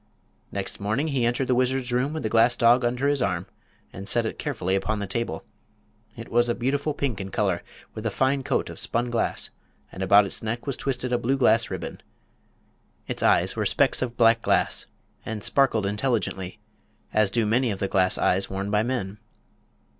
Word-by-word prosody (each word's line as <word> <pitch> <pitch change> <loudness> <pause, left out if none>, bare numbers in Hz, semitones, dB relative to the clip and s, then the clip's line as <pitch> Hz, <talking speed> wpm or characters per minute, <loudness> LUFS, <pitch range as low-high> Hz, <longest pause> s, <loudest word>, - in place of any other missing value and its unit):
Next 100 -1 -4
morning 110 +10 -1
he 130 -5 +1
entered 120 +2 0
the 130 - +2
wizard's 125 0 0
room 125 +4 +1
with 160 - -4
the - - 0
glass 115 +2 +4
dog 120 +1 +5
under 125 +3 0
his 145 -2 +1
arm 90 -2 -1 0.5
and 95 +1 -8
set 120 -1 +2
it - - -4
carefully 110 - -2
upon 95 +3 -1
the 100 - -3
table. 115 +4 -3 0.7
It 115 - -8
was 120 +1 +2
a 120 - +1
beautiful 140 +4 -1
pink 125 -10 -2
in 95 - -6
color, 95 -3 0 0.3
with 110 - -7
a - - +1
fine 135 +5 +1
coat - - -1
of - - -10
spun 120 +1 -1
glass, 115 - -1 0.4
and 95 - -8
about 100 +2 +6
its 100 - -3
neck 115 +2 -3
was 140 -3 -2
twisted 125 -1 -2
a 120 - +2
blue 130 +4 0
glass 115 -3 +3
ribbon. - - -6 1.1
Its - - -3
eyes - - +3
were - - -1
specks - - +2
of 120 -2 -3
black 115 -1 +5
glass - - +1 0.4
and 110 -2 -5
sparkled 125 -7 +3
intelligently, 105 -3 -1 0.6
as 110 -2 +3
do 115 +2 +1
many 120 +4 +2
of 100 - -2
the 100 - -1
glass 95 -1 +2
eyes 95 +2 +1
worn 100 +1 -3
by 105 0 +3
men. 110 -4 -3
115 Hz, 195 wpm, -25 LUFS, 100-125 Hz, 1.1 s, about